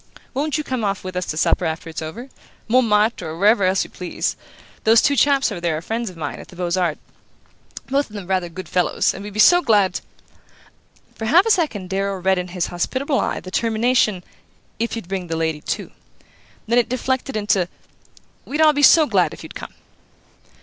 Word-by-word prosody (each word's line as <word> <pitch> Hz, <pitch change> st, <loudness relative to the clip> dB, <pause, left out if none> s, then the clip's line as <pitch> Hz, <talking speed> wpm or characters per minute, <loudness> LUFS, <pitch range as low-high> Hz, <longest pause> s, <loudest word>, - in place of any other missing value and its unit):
Won't 295 Hz, +3 st, -1 dB
you 305 Hz, -, -2 dB
come 255 Hz, -5 st, -3 dB
off 195 Hz, -2 st, -1 dB
with 185 Hz, 0 st, -6 dB
us 180 Hz, 0 st, -2 dB
to 155 Hz, -, -4 dB
supper -, -, +2 dB
after 160 Hz, 0 st, -3 dB
it's 165 Hz, 0 st, -6 dB
over? 200 Hz, +12 st, -7 dB, 0.4 s
Montmartre, 225 Hz, -2 st, +2 dB
or 160 Hz, +1 st, -6 dB
wherever 205 Hz, +3 st, +4 dB
else 190 Hz, +1 st, +2 dB
you -, -, -11 dB
please. 180 Hz, -1 st, -3 dB, 0.5 s
Those 225 Hz, +1 st, +6 dB
two 285 Hz, +3 st, +2 dB
chaps 275 Hz, -3 st, +3 dB
over 180 Hz, -4 st, -5 dB
there 170 Hz, -3 st, 0 dB
are -, -, -5 dB
friends 225 Hz, +2 st, -3 dB
of 180 Hz, -, -13 dB
mine, 150 Hz, -3 st, -5 dB
at -, -, -11 dB
the -, -, -15 dB
Beaux 175 Hz, -1 st, -3 dB
Arts; 175 Hz, -5 st, 0 dB, 0.9 s
both 275 Hz, 0 st, 0 dB
of 210 Hz, -, -13 dB
them 200 Hz, -3 st, -6 dB
rather 185 Hz, -1 st, -1 dB
good 185 Hz, +2 st, -8 dB
fellows 180 Hz, -2 st, +1 dB
and 195 Hz, -, -8 dB
we'd 205 Hz, -, -7 dB
be -, -, -4 dB
so 350 Hz, +11 st, +7 dB
glad 205 Hz, -, +2 dB, 0.6 s
" -, -, -31 dB
For 225 Hz, -, -4 dB
half 335 Hz, -, +5 dB
a 450 Hz, -, +2 dB
second 230 Hz, -, 0 dB
Darrow 195 Hz, 0 st, -1 dB
read 190 Hz, 0 st, +2 dB
in 180 Hz, -, -4 dB
his 180 Hz, -1 st, -2 dB
hospitable 265 Hz, -, -1 dB
eye -, -, -2 dB
the 185 Hz, -, -10 dB
termination 225 Hz, -3 st, +1 dB, 0.6 s
"if 230 Hz, +1 st, -1 dB
you'd 225 Hz, -6 st, -7 dB
bring 185 Hz, -1 st, -4 dB
the 165 Hz, -1 st, -3 dB
lady 160 Hz, -2 st, -1 dB
too"; -, -, -4 dB, 0.8 s
then 235 Hz, +2 st, +4 dB
it 240 Hz, -, 0 dB
deflected 260 Hz, 0 st, -2 dB
into: 205 Hz, -4 st, +1 dB, 0.8 s
"We'd 295 Hz, -, -4 dB
all 310 Hz, -1 st, +6 dB
be 290 Hz, -, 0 dB
so 310 Hz, +2 st, +7 dB
glad -, -, +1 dB
if -, -, -13 dB
you'd -, -, -10 dB
come." -, -, -9 dB
205 Hz, 210 wpm, -21 LUFS, 180-250 Hz, 0.9 s, so